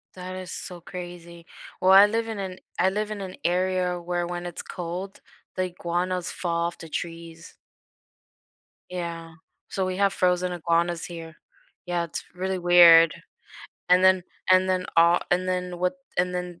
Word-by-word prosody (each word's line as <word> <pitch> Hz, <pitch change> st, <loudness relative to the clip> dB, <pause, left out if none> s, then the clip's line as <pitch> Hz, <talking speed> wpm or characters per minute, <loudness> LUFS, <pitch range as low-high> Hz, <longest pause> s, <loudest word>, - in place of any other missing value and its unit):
That 185 Hz, 0 st, -7 dB
is 185 Hz, -2 st, -7 dB
so 180 Hz, -1 st, -7 dB
crazy. 170 Hz, -1 st, -9 dB, 0.4 s
Well, 185 Hz, +1 st, +5 dB
I 195 Hz, +1 st, +10 dB
live 225 Hz, +2 st, -1 dB
in 225 Hz, -, -5 dB
an 190 Hz, -1 st, -5 dB, 0.2 s
I 185 Hz, -, +4 dB
live 210 Hz, +1 st, -2 dB
in 215 Hz, -1 st, -5 dB
an 185 Hz, -1 st, -7 dB
area 180 Hz, 0 st, 0 dB
where 175 Hz, 0 st, -2 dB
when 175 Hz, 0 st, -5 dB
it's 175 Hz, -1 st, -6 dB
cold, 180 Hz, +3 st, -6 dB, 0.3 s
the 185 Hz, -, 0 dB
iguanas 180 Hz, 0 st, -2 dB
fall 170 Hz, -1 st, -1 dB
off 170 Hz, -, -7 dB
the 165 Hz, -, -10 dB
trees. 165 Hz, 0 st, -7 dB, 1.3 s
Yeah, 170 Hz, -2 st, -6 dB, 0.3 s
so 190 Hz, -1 st, -1 dB
we 185 Hz, 0 st, -3 dB
have 200 Hz, -1 st, +2 dB
frozen 180 Hz, 0 st, +1 dB
iguanas 170 Hz, 0 st, 0 dB
here. 165 Hz, -2 st, -9 dB, 0.5 s
Yeah, 175 Hz, -1 st, -1 dB
it's 165 Hz, -, -6 dB
really 190 Hz, +1 st, -2 dB
weird. 170 Hz, -2 st, +7 dB, 0.8 s
And 180 Hz, +1 st, +5 dB
then 185 Hz, -1 st, +5 dB, 0.3 s
and 185 Hz, 0 st, +5 dB
then, 185 Hz, 0 st, 0 dB
uh 170 Hz, +1 st, +6 dB
and 185 Hz, +1 st, +1 dB
then 180 Hz, -1 st, -2 dB
what 180 Hz, +1 st, 0 dB, 0.2 s
and 180 Hz, 0 st, +1 dB
then 180 Hz, -1 st, -5 dB
180 Hz, 165 wpm, -25 LUFS, 170-185 Hz, 1.3 s, I